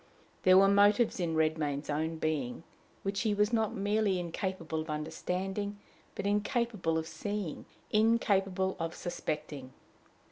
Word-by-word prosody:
There 185 0 +6
were 195 +1 +7
motives 205 +3 +4
in 165 -2 0
Redmain's 155 -2 0
own 160 +2 -1
being, 155 -4 -2 0.4
which 200 +1 -1
he 215 -3 +1
was 210 +3 +2
not 220 -2 +1
merely 205 -1 +1
incapable 170 -2 -3
of 155 - -8
understanding, 185 +6 -3 0.4
but - - -4
incapable 210 -4 0
of 160 - -2
seeing, 205 -3 -4 0.3
incapable 195 -4 +2
of 165 0 -3
suspecting. 150 -6 -5
190 Hz, 130 wpm, -31 LUFS, 160-205 Hz, 0.4 s, were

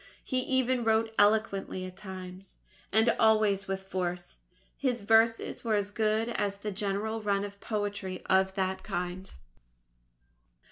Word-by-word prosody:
He 255 - 0
even 255 -1 +1
wrote 225 0 +2
eloquently 205 -3 +2
at 185 0 -9
times, 185 -1 -9 0.4
and 220 +3 +4
always 215 -3 +3
with 190 0 -3
force. 180 -2 -4 0.4
His 250 -6 -1
verses 225 +2 +3
were 225 -2 +1
as 205 0 -1
good 220 +2 +1
as 205 -4 -1
the 205 +1 -5
general 205 +2 -2
run 200 -1 0
of 200 0 -10
poetry 205 -4 -3
of 190 0 +2
that 190 -1 -1
kind. 180 +1 -4
205 Hz, 135 wpm, -29 LUFS, 190-220 Hz, 0.4 s, and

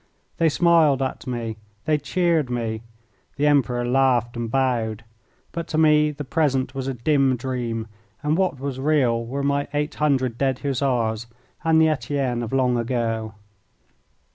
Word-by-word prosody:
They 165 -1 +3
smiled 160 -4 +4
at 130 - -4
me. 115 -3 -3 0.3
They 155 -1 +2
cheered 160 -1 +1
me. 115 -2 -2 0.5
The 145 - 0
Emperor 125 -4 +2
laughed 125 -2 +2
and 120 -1 -3
bowed. 120 -4 0 0.5
But 170 -1 -5
to 155 - -2
me 150 -1 +5
the 150 0 -6
present 135 -3 0
was 135 -1 -4
a 135 - -2
dim 135 +1 +2
dream, 120 -3 -3 0.4
and 150 +1 +1
what 185 -7 0
was 135 -1 -4
real 130 -5 +2
were 135 +4 -4
my 140 0 0
eight 150 +1 -1
hundred 130 -5 0
dead 135 -2 +1
Hussars 120 -5 0 0.4
and 160 -1 +4
the 160 - +5
Etienne 135 -5 -1
of 115 - -4
long 125 -2 +2
ago. 115 -2 -2
135 Hz, 155 wpm, -23 LUFS, 120-150 Hz, 0.5 s, me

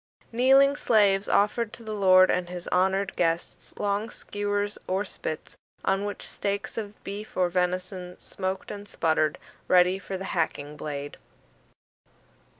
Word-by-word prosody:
Kneeling 270 +4 +5
slaves 205 -7 +3
offered 210 +2 +2
to 230 - -10
the 215 -1 -5
lord 185 -2 +6
and 180 -1 -1
his 180 -1 -7
honoured 190 +2 +1
guests 165 0 -1
long 205 +2 -1
skewers 205 -1 -3
or 190 +2 0
spits, 155 -4 -6 0.3
on 195 +1 +1
which 205 - -5
steaks 200 0 -3
of 210 -2 -6
beef 205 +1 -7
or 180 -1 +3
venison 180 0 -2
smoked 190 0 -4
and 205 0 -8
sputtered, 155 -2 +1 0.3
ready 180 +1 +5
for 195 -1 -5
the 190 - -6
hacking 150 -3 -1
blade. 145 -1 -5
195 Hz, 140 wpm, -27 LUFS, 180-205 Hz, 0.3 s, lord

